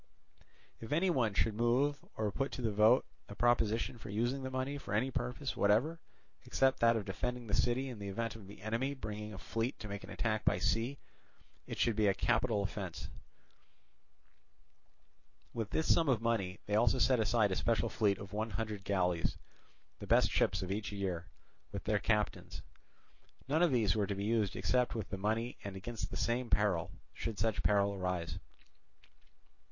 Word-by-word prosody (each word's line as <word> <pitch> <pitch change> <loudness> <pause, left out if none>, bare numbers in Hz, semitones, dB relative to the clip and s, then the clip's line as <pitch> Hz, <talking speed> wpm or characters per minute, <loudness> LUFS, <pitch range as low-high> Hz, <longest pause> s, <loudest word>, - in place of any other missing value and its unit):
If 115 - -8
any 175 +5 +3
one 115 -10 +1
should 110 - +2
move 125 +6 +1
or 105 -2 -1
put 135 +6 -2
to 125 - -5
the 110 - +1
vote 110 +5 +5 0.2
a 100 - -8
proposition 115 +1 +1
for 110 - -9
using 120 +6 0
the 130 - -4
money 130 +2 -2
for 105 - -4
any 125 +5 +1
purpose 60 - -3
whatever 115 +12 +2 0.4
except 135 0 +2
that 115 0 +5
of 110 -3 -2
defending 125 +5 -3
the 105 - -6
city 125 +5 +2
in 120 -5 -7
the 100 - -5
event 115 +3 -3
of 105 -4 -11
the 100 0 -12
enemy 120 +6 -1
bringing 105 -3 -6
a 100 - -8
fleet 115 +6 -2
to 105 - -8
make 100 0 -6
an - - -10
attack 110 -2 -1
by - - +3
sea, 120 +5 0 0.7
it - - -5
should 115 -3 +2
be 105 -1 +3
a 100 - +3
capital 110 -1 +1
offence. 100 -3 -5 2.4
With 115 -3 -3
this 160 - +3
sum 165 -3 +2
of 125 -5 +3
money 110 -5 -1
they 105 - -4
also 120 +5 +4
set 125 0 +4
aside 110 -2 +3
a - - +1
special 115 +3 +1
fleet 100 -4 +1
of 100 0 -9
one 110 +2 -1
hundred 105 -1 -4
galleys, 90 -4 0 0.6
the - - -8
best - - +4
ships 95 - +2
of 95 - -4
each 105 +1 -2
year, 95 -4 -3 0.4
with 100 -2 -5
their 105 -1 +1
captains. 105 -1 -1 0.8
None 155 +4 +2
of 175 -3 +4
these 110 -6 +3
were 105 -2 +1
to 100 - -2
be 100 +1 -3
used 110 -3 +1
except 125 -1 +1
with 110 -4 -4
the 95 - -2
money 110 +4 -1
and 100 -1 -6
against 100 0 -5
the - - -5
same 120 +1 0
peril, 95 -6 +2 0.2
should 115 -3 -4
such 110 0 0
peril 100 -1 +3
arise. 90 -3 -2
110 Hz, 185 wpm, -34 LUFS, 100-120 Hz, 2.4 s, vote